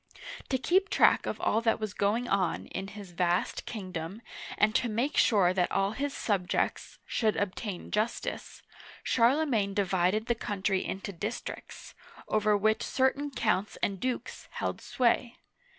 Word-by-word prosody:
To 260 - +2
keep 375 +9 +2
track - - +4
of - - -3
all 220 - +2
that 230 -1 +2
was 215 -2 -3
going 215 +5 +1
on 190 -3 0
in 190 +1 -5
his 200 -2 -10
vast 175 0 0
king 195 -5 -6
dom, 180 +6 -5 0.3
and 215 +1 +3
to 240 - +1
make 240 +7 -1
sure 190 -5 +4
that 180 -1 +1
all 195 +1 +1
his 280 +6 -2
subjects 195 -9 -1
should 220 -2 +1
.obtain 200 -1 -3
justice, 215 +2 -2 0.4
Charlemagne 235 -5 +2
divided 195 +2 +1
the 240 - +2
country 200 -4 -1
into 195 +1 -5
districts, 210 +7 -6 0.3
over 215 -1 +3
which 215 +2 +2
certain 275 +2 +1
counts 215 -6 0
and 195 -2 0
dukes 255 +3 -4
held - - -3
sway. 240 -1 +1
210 Hz, 150 wpm, -29 LUFS, 195-235 Hz, 0.4 s, track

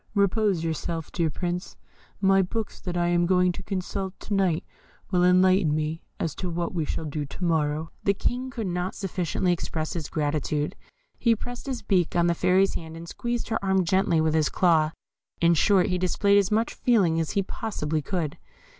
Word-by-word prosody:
Repose 200 -3 +2
yourself, 165 0 -3
dear 165 -2 0
Prince; 175 +3 -4 0.4
my 195 -1 +4
books 215 +4 -3
that 180 -1 -4
I 175 0 +2
am 175 0 +2
going 180 0 +3
to - - -7
consult 190 -1 -4
to 210 - -4
night 190 -5 +1 0.5
will 180 -2 +3
enlighten 185 -3 +4
me 155 +1 -2 0.2
as 160 - -1
to 185 - -3
what 170 +1 -2
we 165 -4 -1
shall 160 - -3
do 150 0 -3
to 145 +6 -8
morrow." 160 -1 0
The 200 - +2
King 250 +5 -2
could 230 -4 -4
not 180 0 -2
sufficiently 185 -2 -1
express 160 -2 -3
his 160 -4 -4
gratitude 150 0 -1 0.4
he 230 -2 +3
pressed 245 +4 -8
his 260 -3 -3
beak 180 -5 +1
on 170 -1 +3
the 170 - +3
Fairy's 185 +3 +3
hand, 160 0 -6
and 165 +1 -9
squeezed 240 +5 -3
her 225 -3 -1
arm 190 -1 +2
gently 180 -1 +2
with 155 0 +2
his 155 -1 +2
claw 160 -4 +3 0.5
in 170 0 +4
short, 185 +3 +4
he 180 - 0
displayed 200 +3 +3
as 200 -1 +1
much 225 +2 +1
feeling 190 -10 +2
as 160 - -2
he 200 - +3
possibly 160 -8 -3
could. 160 -2 -3
180 Hz, 190 wpm, -26 LUFS, 160-195 Hz, 0.5 s, my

